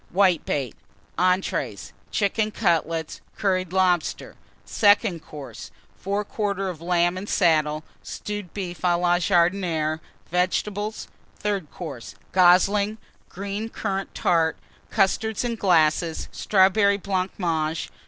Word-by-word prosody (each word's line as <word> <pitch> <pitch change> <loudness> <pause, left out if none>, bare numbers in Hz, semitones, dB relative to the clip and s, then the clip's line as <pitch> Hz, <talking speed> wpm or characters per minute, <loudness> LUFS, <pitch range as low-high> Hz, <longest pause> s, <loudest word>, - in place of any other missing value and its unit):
Whitebait. 170 - +1 0.5
ENTREES. 185 +1 0 0.2
Chicken 215 +1 0
Cutlets. 165 -5 -1 0.2
Curried 185 -3 0
Lobster. 180 -3 +1 0.3
SECOND 205 -5 +3
COURSE. 145 -3 -9 0.3
Fore 200 +2 -2
quarter 200 -2 -2
of 170 -3 -7
Lamb 175 +1 +1
and 200 - -7
Salad. 155 -4 +2 0.2
Stewed 205 -4 -6
Beef 175 -4 -6
à 175 -1 +2
la 175 0 +3
Jardinière. 170 -3 +1 0.3
Vegetables. 205 +4 -1 0.3
THIRD 200 -7 -2
COURSE. 145 -9 -8 0.2
Goslings. 195 +4 +4 0.3
Green 200 +3 -5
Currant 195 -3 -4
Tart. 165 -2 +2 0.3
Custards, 215 +2 +1
in 240 -1 -1
glasses. 165 -5 +2
Strawberry 200 +1 +3
Blancmange. 180 -5 -2
185 Hz, 105 wpm, -24 LUFS, 170-200 Hz, 0.5 s, Goslings